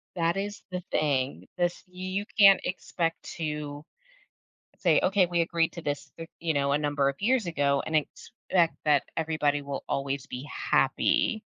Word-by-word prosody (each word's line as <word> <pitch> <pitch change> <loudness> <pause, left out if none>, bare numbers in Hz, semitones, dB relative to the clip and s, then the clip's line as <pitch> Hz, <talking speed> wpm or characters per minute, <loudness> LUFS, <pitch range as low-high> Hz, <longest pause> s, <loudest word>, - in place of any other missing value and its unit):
that 170 +2 +1
is 205 +1 -4
the 180 0 -3
thing. 140 -3 0
This 175 0 0
you 185 +2 -4
can't 195 -2 +8
expect 165 -2 -2
to 150 -2 -4 0.9
say, 170 -4 +4
"Okay, 190 -1 +4
we 170 0 0
agreed 165 -1 +1
to 170 - -8
this, 145 -1 -3 0.3
you 165 -2 0
know, 140 0 +1
a 145 - +3
number 145 -2 +1
of 140 - -2
years 230 -1 +2
ago 140 -4 +1
and 160 - 0
expect 170 +2 -1
that 145 -3 +4
everybody 155 -3 0
will 140 -1 -5
always 140 0 -2
be 130 +4 -7
happy." - - +2
155 Hz, 155 wpm, -28 LUFS, 145-180 Hz, 0.9 s, can't